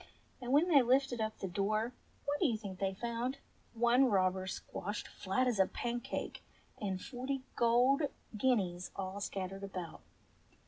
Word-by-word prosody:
And 245 Hz, 0 st, -3 dB
when 295 Hz, +6 st, +5 dB
they 300 Hz, -6 st, +7 dB
lifted 255 Hz, -1 st, +2 dB
up 220 Hz, 0 st, -2 dB
the 190 Hz, -, -3 dB
door 215 Hz, +6 st, 0 dB, 0.3 s
what 290 Hz, +1 st, 0 dB
do 345 Hz, -, +4 dB
you 230 Hz, -4 st, +1 dB
think 195 Hz, -4 st, -7 dB
they 195 Hz, -1 st, 0 dB
found 235 Hz, +4 st, -2 dB, 0.4 s
^ -, -, -10 dB
One 240 Hz, +3 st, +5 dB
robber 190 Hz, -4 st, +2 dB
squashed 205 Hz, +2 st, -4 dB
flat 200 Hz, +7 st, 0 dB
as 235 Hz, -5 st, +1 dB
a 190 Hz, -, +6 dB
pancake 240 Hz, 0 st, -3 dB, 0.4 s
and 190 Hz, -3 st, -1 dB
forty 260 Hz, +3 st, -4 dB
golden 250 Hz, +5 st, +4 dB, 0.3 s
guineas 195 Hz, -7 st, +1 dB
all 195 Hz, +1 st, -4 dB
scattered 195 Hz, 0 st, -4 dB
about 180 Hz, -, -6 dB
225 Hz, 155 wpm, -34 LUFS, 195-255 Hz, 0.4 s, they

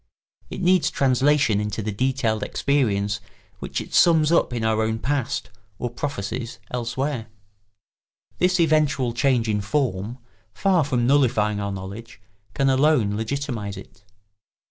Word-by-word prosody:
It -, -, -6 dB
needs 180 Hz, -1 st, +4 dB
translation 135 Hz, -4 st, +2 dB
into 105 Hz, +1 st, -3 dB
the 110 Hz, -, -2 dB
detailed 120 Hz, 0 st, 0 dB
experience 105 Hz, -7 st, 0 dB, 0.4 s
which -, -, -4 dB
it -, -, -9 dB
sums 160 Hz, -2 st, +5 dB
up 170 Hz, -, +3 dB
in 120 Hz, -2 st, -3 dB
our 110 Hz, 0 st, +2 dB
own 110 Hz, 0 st, 0 dB
past 130 Hz, -3 st, -2 dB, 0.3 s
or 120 Hz, +2 st, -3 dB
prophecies 120 Hz, -3 st, -4 dB
elsewhere. 125 Hz, +1 st, -3 dB, 1.1 s
This 180 Hz, 0 st, +2 dB
eventual 150 Hz, -6 st, +2 dB
change 120 Hz, -1 st, +1 dB
in 105 Hz, -1 st, 0 dB
form, 110 Hz, -1 st, -1 dB, 0.4 s
far 190 Hz, -5 st, +2 dB
from 125 Hz, -4 st, 0 dB
nullifying 115 Hz, -6 st, +2 dB
our 100 Hz, 0 st, -3 dB
knowledge, 100 Hz, +4 st, -8 dB, 0.4 s
can 135 Hz, -, +2 dB
alone 135 Hz, -5 st, +3 dB
legitimise 110 Hz, -3 st, -3 dB
it. 95 Hz, +1 st, -13 dB
120 Hz, 130 wpm, -23 LUFS, 110-140 Hz, 1.1 s, sums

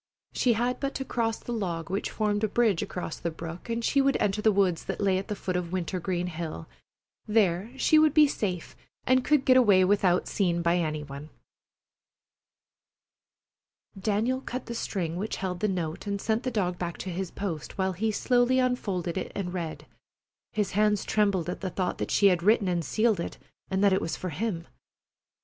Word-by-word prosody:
She 245 Hz, -, +3 dB
had 240 Hz, +3 st, 0 dB
but 275 Hz, 0 st, -3 dB
to 270 Hz, -, -3 dB
cross 225 Hz, -3 st, -1 dB
the 240 Hz, -, -6 dB
log 175 Hz, -6 st, -3 dB
which 195 Hz, -, -1 dB
formed 210 Hz, -1 st, -1 dB
a -, -, +4 dB
bridge 215 Hz, -4 st, +2 dB
across 180 Hz, -3 st, -4 dB
the 170 Hz, -, -2 dB
brook 165 Hz, +4 st, -8 dB
and 230 Hz, 0 st, -1 dB
she 280 Hz, -, +3 dB
would 275 Hz, 0 st, +2 dB
enter 210 Hz, +1 st, +1 dB
the 220 Hz, -, +4 dB
woods 190 Hz, -4 st, +1 dB
that -, -, -4 dB
lay 195 Hz, -2 st, +2 dB
at 195 Hz, -, -7 dB
the 210 Hz, -, -3 dB
foot 185 Hz, -2 st, -3 dB
of 175 Hz, -1 st, -2 dB
Wintergreen 180 Hz, 0 st, -2 dB
Hill. 160 Hz, -, -5 dB, 0.6 s
There 205 Hz, -2 st, +2 dB
she 310 Hz, +3 st, +5 dB
would 310 Hz, -1 st, +4 dB
be 305 Hz, -1 st, +8 dB
safe 185 Hz, -, -3 dB, 0.3 s
and 255 Hz, 0 st, +3 dB
could 300 Hz, -1 st, +2 dB
get 255 Hz, -1 st, +6 dB
away 200 Hz, -7 st, +6 dB
without 185 Hz, -2 st, +2 dB
seen 175 Hz, -4 st, 0 dB
by 170 Hz, +1 st, +3 dB
any 155 Hz, -3 st, -1 dB
one. 140 Hz, +1 st, -9 dB, 2.7 s
Daniel 220 Hz, +6 st, 0 dB
cut 255 Hz, -1 st, -5 dB
the 235 Hz, -, -5 dB
string 175 Hz, -7 st, -3 dB
which 210 Hz, +4 st, -3 dB
held 180 Hz, -2 st, -3 dB
the 215 Hz, -, +1 dB
note 175 Hz, -1 st, -3 dB
and 200 Hz, 0 st, -1 dB
sent 220 Hz, +2 st, 0 dB
the 260 Hz, -, -2 dB
dog 180 Hz, -7 st, -1 dB
back 175 Hz, -1 st, -3 dB
to 185 Hz, -, -5 dB
his 185 Hz, +1 st, -3 dB
post, 170 Hz, -7 st, -5 dB
while 190 Hz, -1 st, 0 dB
he 215 Hz, +5 st, 0 dB
slowly 245 Hz, +3 st, +2 dB
unfolded 195 Hz, -9 st, 0 dB
it -, -, -5 dB
and 180 Hz, -3 st, -3 dB
read, 170 Hz, -4 st, -5 dB, 0.7 s
his 210 Hz, -3 st, -1 dB
hands 210 Hz, +1 st, +2 dB
trembling 200 Hz, -5 st, +1 dB
at 180 Hz, -, -4 dB
the 190 Hz, -, -2 dB
thought 185 Hz, 0 st, -2 dB
that -, -, -2 dB
she 205 Hz, -, +3 dB
had 180 Hz, -3 st, +5 dB
written 210 Hz, +2 st, +3 dB
and 175 Hz, -2 st, 0 dB
sealed 220 Hz, -, +1 dB
it, 170 Hz, -, -4 dB, 0.3 s
and 190 Hz, +1 st, 0 dB
that 200 Hz, -2 st, +5 dB
it 190 Hz, -, +2 dB
was 165 Hz, -, -3 dB
for 185 Hz, -, -4 dB
him. 170 Hz, 0 st, -3 dB
195 Hz, 200 wpm, -28 LUFS, 175-225 Hz, 2.7 s, be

